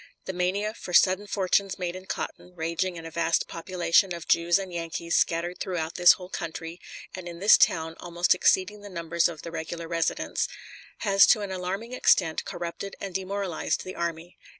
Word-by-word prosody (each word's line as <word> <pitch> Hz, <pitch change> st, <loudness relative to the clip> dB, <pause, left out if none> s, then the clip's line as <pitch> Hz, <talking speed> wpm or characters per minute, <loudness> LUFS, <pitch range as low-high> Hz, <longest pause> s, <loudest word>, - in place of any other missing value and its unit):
The 190 Hz, -, -4 dB
mania 190 Hz, +4 st, -1 dB
for 180 Hz, -, -9 dB
sudden 190 Hz, +3 st, +4 dB
fortunes 195 Hz, 0 st, +1 dB
made 180 Hz, -2 st, -3 dB
in 185 Hz, +1 st, -10 dB
cotton, 180 Hz, -, -6 dB
raging 170 Hz, +2 st, -2 dB
in 165 Hz, -1 st, -8 dB
a 165 Hz, -, -7 dB
vast 165 Hz, 0 st, +1 dB
population 175 Hz, +1 st, +1 dB
of 170 Hz, -, -9 dB
Jews 170 Hz, +1 st, +4 dB
and 190 Hz, -2 st, -6 dB
Yankees 170 Hz, 0 st, -3 dB
scattered 175 Hz, +2 st, +1 dB
throughout 170 Hz, -3 st, -3 dB
this 175 Hz, 0 st, +7 dB
whole 180 Hz, -, -9 dB
country, 165 Hz, -1 st, -6 dB, 0.3 s
and 185 Hz, -1 st, -7 dB
in 170 Hz, -1 st, -7 dB
this 200 Hz, +5 st, +7 dB
town 160 Hz, -1 st, +2 dB
almost 175 Hz, 0 st, +2 dB
exceeding 190 Hz, +3 st, +2 dB
the 205 Hz, -, -10 dB
numbers 170 Hz, -1 st, 0 dB
of 160 Hz, -3 st, -9 dB
the 165 Hz, -, -6 dB
regular 165 Hz, +1 st, -5 dB
residents, 165 Hz, 0 st, -1 dB, 0.5 s
has 195 Hz, -2 st, +6 dB
to 215 Hz, -, +5 dB
an 200 Hz, -2 st, -4 dB
alarming 190 Hz, +6 st, -4 dB
extent 165 Hz, -9 st, +2 dB
corrupted 175 Hz, +3 st, -6 dB
and 195 Hz, -2 st, -6 dB
demoralized 190 Hz, -2 st, -2 dB
the 185 Hz, -, -7 dB
army. 170 Hz, 0 st, -5 dB
175 Hz, 180 wpm, -27 LUFS, 170-190 Hz, 0.5 s, this